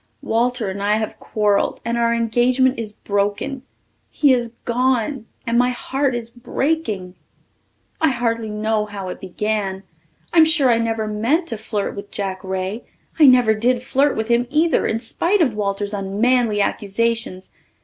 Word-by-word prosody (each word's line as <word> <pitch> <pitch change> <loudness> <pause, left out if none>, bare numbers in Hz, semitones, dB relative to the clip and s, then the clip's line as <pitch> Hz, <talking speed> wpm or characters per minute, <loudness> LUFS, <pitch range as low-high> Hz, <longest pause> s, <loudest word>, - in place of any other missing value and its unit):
Walter 240 0 0
and 200 +1 -6
I 205 +1 +2
have 220 0 -3
quarrelled 210 -2 0
and 235 0 -1
our 235 0 +2
engagement 245 +3 +2
is 220 -2 -4
broken. 205 +7 -2 0.5
He 285 -3 +3
is 240 -2 -1
gone 250 0 0 0.2
and 235 +1 +2
my 250 0 +3
heart 265 +1 -1
is 235 -1 -4
breaking. 240 - -2 0.9
I 320 - +4
hardly 230 -3 -1
know 210 0 -1
how 200 -2 -6
it - - -7
began. 195 0 -3 0.5
I'm 325 -2 +7
sure 305 -6 +3
I 230 - +3
never 225 -1 -1
meant 235 +11 0
to 230 - -3
flirt 210 -2 -3
with 200 0 -8
Jack 195 -1 -4
Ray. 190 +4 -3 0.4
I 300 - +8
never 250 -4 +6
did 240 +3 +1
flirt 275 +2 +1
with 220 0 -1
him 240 +1 +2
either, 310 +3 +2
in 220 - 0
spite 340 - 0
of 285 -10 +2
Walter's 205 0 -2
unmanly 210 +3 +1
accusations. 205 -1 -2
230 Hz, 160 wpm, -20 LUFS, 205-250 Hz, 0.9 s, I